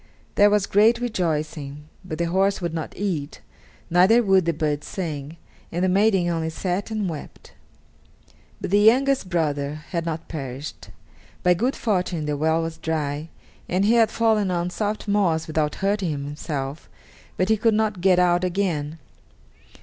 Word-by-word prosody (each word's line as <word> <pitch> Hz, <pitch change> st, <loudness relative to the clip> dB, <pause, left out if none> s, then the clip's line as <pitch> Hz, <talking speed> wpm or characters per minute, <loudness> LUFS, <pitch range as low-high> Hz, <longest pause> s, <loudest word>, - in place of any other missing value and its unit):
There 205 Hz, 0 st, +5 dB
was 205 Hz, -1 st, +2 dB
great 220 Hz, +4 st, +4 dB
rejoicing, 155 Hz, -, -3 dB, 0.2 s
but 180 Hz, -4 st, -6 dB
the 170 Hz, -, 0 dB
horse 190 Hz, +3 st, +1 dB
would 170 Hz, -3 st, -3 dB
not 160 Hz, -2 st, -5 dB
eat, 170 Hz, -8 st, -3 dB, 0.5 s
neither 185 Hz, +8 st, +5 dB
would 190 Hz, -4 st, +4 dB
the 170 Hz, -, +2 dB
bird 150 Hz, -2 st, -1 dB
sing, 155 Hz, -4 st, -5 dB, 0.3 s
and 175 Hz, +2 st, -1 dB
the -, -, +2 dB
maiden 195 Hz, -1 st, +3 dB
only 165 Hz, -2 st, -1 dB
sat 180 Hz, +5 st, -3 dB
and 215 Hz, -3 st, -2 dB
wept. 155 Hz, -4 st, -8 dB, 1.1 s
But -, -, -5 dB
the 205 Hz, -, +5 dB
youngest 255 Hz, 0 st, +4 dB
brother 150 Hz, -4 st, -1 dB, 0.2 s
had 170 Hz, -2 st, -2 dB
not 165 Hz, 0 st, -4 dB
perished. 140 Hz, -2 st, -7 dB, 0.5 s
By 180 Hz, -, +5 dB
good 245 Hz, +9 st, 0 dB
fortune 180 Hz, -7 st, -1 dB
the 150 Hz, 0 st, -1 dB
well 160 Hz, +3 st, +1 dB
was 165 Hz, 0 st, -5 dB
dry, 155 Hz, -1 st, -2 dB, 0.4 s
and 185 Hz, +3 st, +1 dB
he 220 Hz, -, +4 dB
had 230 Hz, -2 st, +5 dB
fallen 220 Hz, -4 st, +2 dB
on 175 Hz, 0 st, -1 dB
soft 210 Hz, +3 st, -3 dB
moss 180 Hz, -6 st, +1 dB
without 155 Hz, -1 st, -1 dB
hurting 200 Hz, -3 st, +1 dB
himself, 145 Hz, 0 st, -5 dB, 0.5 s
but 185 Hz, +2 st, +1 dB
he 220 Hz, -, +5 dB
could 225 Hz, 0 st, +2 dB
not 215 Hz, -4 st, 0 dB
get 185 Hz, -1 st, +4 dB
out 175 Hz, 0 st, +3 dB
again. 170 Hz, -5 st, -1 dB
175 Hz, 160 wpm, -23 LUFS, 155-200 Hz, 1.1 s, There